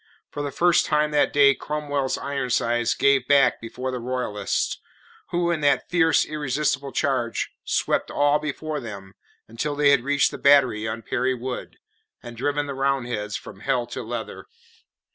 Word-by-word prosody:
For 145 - -5
the 145 - -2
first 175 +5 +3
time 150 0 +1
that 150 - +2
day 140 -1 +6
Cromwell's 145 -2 -2
Ironsides 120 -4 0
gave 140 -2 +3
back 140 -1 +4
before 125 +3 -5
the 125 - -4
Royalists, 120 -5 -2 0.5
who 175 0 0
in 165 -3 -1
that 145 +2 +1
fierce, 165 -2 +3
irresistible 145 -1 -2
charge, 130 -6 -1
swept - - 0
all 145 +1 +2
before 150 +1 -4
them 100 -5 -9 0.3
until 135 +7 -3
they 145 -1 +4
had 140 -3 +4
reached 145 +1 +2
the - - -8
battery 130 -6 +4
on 110 +1 -5
Perry 130 +3 0
Wood, 125 +1 -6 0.5
and 120 -1 -9
driven 145 +4 -1
the 140 - -5
Roundheads 125 -6 -1
from - - -12
it - - -13
hell 120 -1 +1
to - - -4
leather. 115 - -6
140 Hz, 160 wpm, -24 LUFS, 120-145 Hz, 0.5 s, day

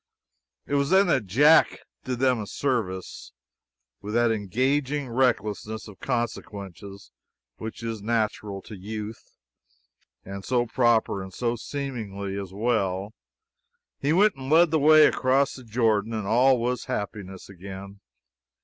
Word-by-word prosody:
It - - -6
was 140 -1 +2
then 190 +2 +5
that 130 - +1
Jack 145 - +5 0.3
did 125 -1 -2
them 130 -1 +2
a 105 - -5
service. 110 -10 -3 0.7
With 105 +2 -5
that 120 -1 +3
engaging 130 +7 0
recklessness 110 -3 -1
of 105 -3 -13
consequences 100 - -5 0.5
which 110 +1 -7
is 115 -2 -4
natural 105 -3 -2
to 110 - -10
youth, 105 +3 -8 0.9
and 100 0 -7
so 120 +1 +1
proper 115 -4 +2
and 95 0 -8
so 120 +3 -1
seemly, 110 -7 -5
as 100 -2 -5
well, 100 -2 -1 0.9
he 140 - 0
went 200 +3 +4
and 130 0 -7
led 165 +1 +5
the 160 - +3
way 155 +1 +7
across 135 +2 +2
the 130 - -11
Jordan, 110 -1 +1
and 110 -2 -3
all 125 +5 +4
was 125 +1 -2
happiness 95 -2 -5
again. 95 +1 -10
115 Hz, 135 wpm, -25 LUFS, 100-130 Hz, 0.9 s, way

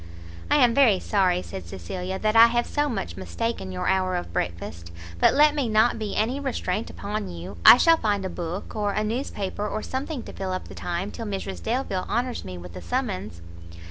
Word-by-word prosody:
"I - - +4
am 250 -5 +5
very 235 -8 +5
sorry," 185 -3 +1
said 90 -3 -8
Cecilia, 180 - -5
"that 215 +2 0
I 230 +1 +9
have 240 +1 0
so 295 0 0
much 200 -7 -4
mistaken 230 -5 -3
your 180 0 -3
hour 185 -1 +1
of 175 - -4
breakfast; 85 0 -4 0.3
but - - +5
let 295 +1 +6
me 280 -6 -1
not 220 +2 +3
be 215 -2 -3
any 240 +6 0
restraint 230 -7 -2
upon 210 +1 -4
you, 85 0 -8
I - - +11
shall 330 +4 +5
find 205 -7 0
a - - -2
book, 175 +2 -5
or 205 -2 0
a 215 - 0
newspaper, 210 -3 -3
or 215 - -3
something 265 0 -4
to - - -10
fill 190 -1 -3
up 185 - -5
the - - -9
time 175 +3 -3
till 230 - -6
Mrs 195 -1 -4
Delvile 225 -6 -2
honours 240 +2 -1
me 90 -2 -7
with 90 0 -10
a 90 - -7
summons." 85 +1 -3
205 Hz, 205 wpm, -25 LUFS, 180-235 Hz, 0.3 s, I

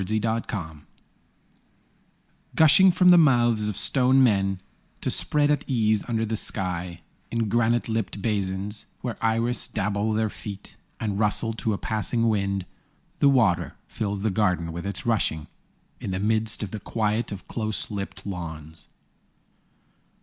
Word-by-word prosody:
In 105 +4 -2
a - - +2
Garden 100 -9 -4 1.7
Gushing 160 +5 +6
from 180 +1 +4
the 175 -1 +8
mouths 120 -7 +3
of 105 - -4
stone 130 0 +4
men 95 -5 +1 0.4
To - - 0
spread 150 -1 +4
at 145 -1 0
ease 110 -5 +1
under 115 -1 0
the 110 +1 -3
sky 90 -3 -1 0.3
In 115 -1 -1
granite 120 +2 +1
lipped 110 -4 -3
basins, 100 -1 -1
Where 120 -2 -4
iris 115 +2 +1
dabble 105 +1 -1
their 110 -1 0
feet 100 -2 -9 0.2
And 105 -2 -3
rustle 110 +1 +1
to 110 -1 -2
a - - -2
passing 115 +3 -1
wind, 100 -3 -1 0.5
The 140 - +5
water 100 -10 +1
fills 100 -2 -4
the 110 - +1
garden 90 -5 0
with 85 +3 -5
its 100 - -5
rushing, 105 -10 +1 0.5
In - - -6
the 95 0 -2
midst 110 +1 +1
of 100 - -6
the 110 - -5
quiet 110 +2 -2
of 95 -3 -8
close 110 -2 0
clipped 100 -2 -7
lawns. 80 -4 -7
110 Hz, 150 wpm, -25 LUFS, 95-115 Hz, 1.7 s, the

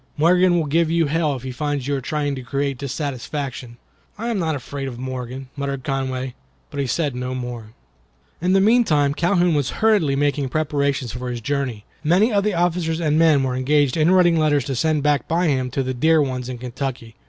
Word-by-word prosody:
"Morgan 175 +3 +4
will 165 - +1
give 160 +3 +2
you 165 0 +2
hell 150 -1 0
if 130 - -8
he 130 - -4
finds 145 +1 -2
you 145 - 0
are 135 - -3
trying 145 +1 -2
to 130 - -5
create 140 0 -2
dissatisfaction." 135 -3 -4 0.4
"I 230 +3 -3
am 225 -4 -1
not 160 -3 0
afraid 140 +1 -5
of 125 -3 -6
Morgan," 130 0 -6
muttered 140 -2 -3
Conway, 130 -1 -2 0.4
but 145 - -5
he 140 - 0
said 145 +1 0
no 125 +1 -4
more. 120 -3 -6 0.7
In 180 +2 +2
the 195 - +5
mean 235 +4 +5
time 145 -7 +2
Calhoun 175 +1 +2
was 145 -3 +1
hurriedly 200 -11 +3
making 145 -1 0
preparations 140 -3 -1
for 125 0 -5
his 120 -1 -4
journey. 130 -4 -3 0.2
Many 190 +9 +3
of 200 -1 +2
the 210 -2 0
officers 170 -1 0
and 155 -2 +1
men 155 -4 +4
were 130 -1 -1
engaged 140 +1 +2
in 155 +1 +3
writing 175 -3 +4
letters 145 -3 +2
to 135 -2 -3
send 155 +2 +1
back 145 -4 +1
by 170 +2 +1
him 130 -3 0
to 135 +2 -1
the 130 0 -2
dear 160 +5 +3
ones 130 -3 -1
in 125 - -5
Kentucky. 125 -2 -5
140 Hz, 210 wpm, -21 LUFS, 130-160 Hz, 0.7 s, the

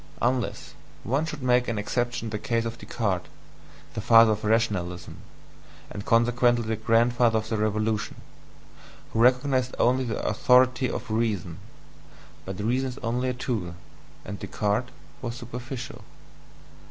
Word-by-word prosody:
Unless 125 0 -1 0.3
one 140 +7 0
should 150 -4 -6
make 125 0 +3
an 115 - -2
exception 120 +3 -1
in - - -3
the 105 - -3
case 115 +1 -1
of 115 0 -5
Descartes, 100 -6 -2 0.7
the - - -3
father 115 0 +7
of 105 +1 -2
rationalism 100 -6 0 0.7
(and 100 - -6
consequently 120 +1 +3
the 110 0 -1
grandfather 115 +1 +3
of 110 0 -3
the 110 - 0
Revolution), 110 0 -1 1.0
who 115 - 0
recognized 130 +1 +3
only 130 +2 +3
the 115 -4 -3
authority 130 +3 +4
of 115 -1 -5
reason: 105 -7 -1 0.9
but 95 0 -6
reason 125 +5 0
is 125 - -8
only 125 +2 0
a - - -1
tool, 110 -9 -3 0.5
and 100 +1 -6
Descartes 105 +5 -1 0.3
was 120 -2 -4
superficial. 125 +1 -7
115 Hz, 140 wpm, -26 LUFS, 110-125 Hz, 1.0 s, father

